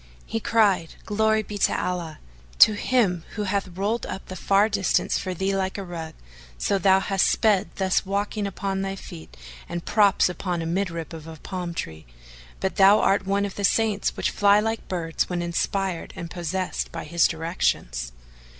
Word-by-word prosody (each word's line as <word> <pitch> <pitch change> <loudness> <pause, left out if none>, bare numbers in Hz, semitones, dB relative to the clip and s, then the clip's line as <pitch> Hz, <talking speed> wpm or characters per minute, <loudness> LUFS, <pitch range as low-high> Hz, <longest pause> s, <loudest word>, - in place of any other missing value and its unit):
He 225 - -3
cried, 205 -7 +2
"Glory 220 +1 +2
be 205 0 -7
to - - +2
Allah! 170 -4 -3 0.4
to 215 - +8
Him 205 -6 +1
who 210 - -2
hath 200 0 -1
rolled 215 +4 -1
up 190 - -6
the 185 - -6
far 200 +3 +3
distance 200 -3 +1
for 185 -1 -4
thee 195 +2 0
like 190 0 -1
a 200 - -4
rug, 165 -3 -7 0.4
so 195 - 0
that - - -11
thou 190 +1 +5
hast 195 -1 +2
sped 210 -3 +2
thus 190 -1 +1
walking 200 +1 -2
upon 195 0 -3
thy 195 0 -3
feet 80 - -11 0.3
and 175 0 -5
props 205 -3 +4
upon 180 -1 -3
a 165 - -3
mid 185 +3 0
rib 165 -1 -6
of 160 0 -10
palm 180 -3 -5
tree! 80 - -6 0.5
But 190 - -2
thou 200 +2 +7
art 195 0 +2
one 200 +1 +1
of 200 - -5
the 200 - -5
saints 210 +1 +1
which - - 0
fly 205 0 +4
like 225 +1 -2
birds 165 -3 -2
when 175 -1 -2
inspired 175 +1 -2
and 170 -1 -7
possessed 180 +1 -3
by - - -5
His 170 -1 +3
directions." 155 - -2
190 Hz, 185 wpm, -24 LUFS, 170-200 Hz, 0.5 s, to